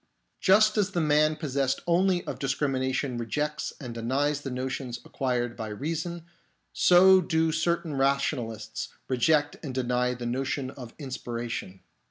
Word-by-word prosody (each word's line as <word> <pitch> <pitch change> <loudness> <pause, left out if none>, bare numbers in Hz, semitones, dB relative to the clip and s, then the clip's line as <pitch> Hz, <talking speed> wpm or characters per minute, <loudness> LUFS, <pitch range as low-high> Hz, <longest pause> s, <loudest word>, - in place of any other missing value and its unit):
Just 215 +3 +5
as 200 -1 0
the 175 - +1
man 155 0 +3
possessed 140 -3 -1
only 175 +1 +2
of - - -5
discrimination 130 -2 -1
rejects 150 +6 -2
and 125 -4 -6
denies 140 +5 0
the 140 - -5
notions 130 -1 -4
acquired 120 -3 -1
by 110 -2 -5
reason, 165 +9 -4 0.5
so 185 +1 +6
do 160 -1 +1
certain 165 0 0
rationalists 135 -5 -1 0.2
reject 145 +3 +2
and 135 -5 -6
deny 125 0 0
the 120 0 -6
notion 130 +2 -2
of 120 -4 -10
inspiration. 120 - -5
135 Hz, 135 wpm, -27 LUFS, 125-160 Hz, 0.5 s, so